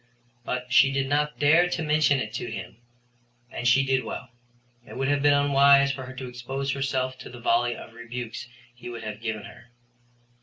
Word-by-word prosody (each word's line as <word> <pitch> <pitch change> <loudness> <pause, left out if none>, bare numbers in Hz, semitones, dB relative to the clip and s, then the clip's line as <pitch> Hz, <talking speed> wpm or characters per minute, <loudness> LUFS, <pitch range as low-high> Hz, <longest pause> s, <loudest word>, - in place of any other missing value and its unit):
But 125 0 -4
she 135 0 +6
did 135 0 0
not 150 +1 0
dare 160 +5 +4
to 175 -2 -2
mention 150 -2 +3
it 110 -4 -4
to 120 0 -4
him 95 -3 -7 0.7
and 120 - -3
she 135 +3 +4
did 130 -1 +1
well. 125 - -7 0.5
It - - -11
would 135 0 -1
have 145 -1 +1
been 145 0 +5
unwise 140 0 +5
for 130 -2 -6
her 130 - -8
to 130 -1 -6
expose 130 +3 -4
herself 130 -1 -2
to - - -9
the 120 - -11
volley 120 0 +1
of 110 - -11
rebukes 120 +1 -7 0.3
he 120 0 -10
would 115 -2 -7
have 105 0 -6
given 110 -2 -4
her. - - -13
130 Hz, 195 wpm, -26 LUFS, 120-140 Hz, 0.7 s, she